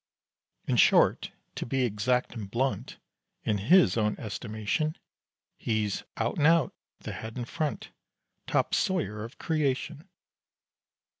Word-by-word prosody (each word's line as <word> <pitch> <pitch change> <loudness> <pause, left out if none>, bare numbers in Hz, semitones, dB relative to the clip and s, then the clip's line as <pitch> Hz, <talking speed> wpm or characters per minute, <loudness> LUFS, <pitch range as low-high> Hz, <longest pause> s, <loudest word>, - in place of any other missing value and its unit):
In - - +1
short, - - +4 0.2
to - - -4
be 130 +2 0
exact 125 +3 0
and 105 -5 -6
blunt, 130 +5 -1 0.5
In 105 -2 0
his 170 - +5
own 105 -1 +1
estimation 110 - -2 0.6
He's 110 -3 -1
"out 115 +7 -1
and 150 - +5
out" 165 -2 +4 0.3
the - - -5
head 110 +2 -7
and 120 -1 -4
front 155 0 -3 0.6
Top - - +1
sawyer 145 - 0
of 115 +5 -9
creation! 150 -1 -1
120 Hz, 125 wpm, -28 LUFS, 110-150 Hz, 0.6 s, his